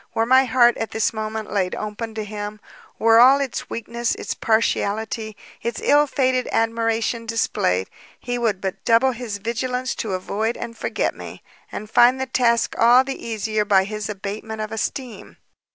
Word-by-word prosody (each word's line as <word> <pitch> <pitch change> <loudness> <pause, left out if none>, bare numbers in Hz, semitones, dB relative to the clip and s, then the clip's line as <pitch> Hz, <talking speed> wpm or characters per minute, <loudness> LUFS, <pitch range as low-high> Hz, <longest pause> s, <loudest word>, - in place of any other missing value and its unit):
were 225 - +2
my 260 +2 +5
heart 240 -1 +4
at 225 - -3
this 220 0 0
moment 215 -1 -4
laid 185 -3 0
open 215 +1 -5
to 215 - -3
him, 210 0 -6 0.4
were 225 0 +5
all 265 +3 +7
its 275 -3 -4
weakness, 235 +1 -2
its - - -4
partiality, 220 -1 -1 0.2
its 235 -1 -3
ill 295 +1 +4
fated 255 -2 0
admiration 230 0 0
displayed, 95 - 0 0.3
he 245 -1 -4
would 220 -5 0
but 190 -1 -5
double 235 +3 +4
his 235 -4 -5
vigilance 250 +4 -2
to 210 -4 -4
avoid 215 +5 -2
and 230 - -6
forget - - -2
me, - - -10 0.3
and 215 - -6
find 245 +4 +5
the 265 - -1
task 235 -3 +1
all 240 +3 +6
the 270 0 -6
easier 215 -1 -1
by 200 -2 +4
his 210 +1 -5
abatement 210 +2 -6
of 215 0 -4
esteem. 235 +2 -5
225 Hz, 170 wpm, -22 LUFS, 215-240 Hz, 0.4 s, all